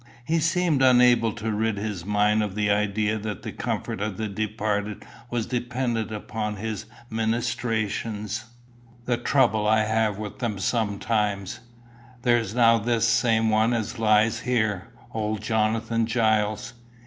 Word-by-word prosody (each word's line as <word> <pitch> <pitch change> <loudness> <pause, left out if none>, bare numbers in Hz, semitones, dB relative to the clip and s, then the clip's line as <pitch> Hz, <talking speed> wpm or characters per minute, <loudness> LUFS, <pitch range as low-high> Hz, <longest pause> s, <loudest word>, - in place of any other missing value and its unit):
He 165 +4 +1
seemed 165 -3 +1
unable 125 -3 +5
to 110 0 -3
rid 110 0 0
his 100 -4 -4
mind 105 +1 +2
of 105 -2 -3
the 105 -1 +1
idea 105 +1 +1
that 105 -2 -5
the - - -5
comfort - - -3
of 105 -3 -3
the 110 - -2
departed 105 0 -2 0.2
was 120 -2 -1
dependent 120 -2 -2
upon 105 0 -4
his 110 +1 -5 0.2
ministrations. 110 -2 -2 0.6
"The 120 -1 +1
trouble 110 -7 +2
I 110 0 +4
have 110 -1 +1
with 105 -1 -7
them 115 -5 -2
sometimes! 105 -1 -1 0.6
There's 120 -4 +2
now 115 -1 +5
this 115 +1 +1
same 115 -1 +3
one 110 +2 +3
as 115 +1 -3
lies 110 0 +3
here, 110 -6 0 0.3
old 110 -1 -2
Jonathan 110 +1 0
Giles. 110 0 +1
110 Hz, 135 wpm, -25 LUFS, 105-115 Hz, 0.6 s, unable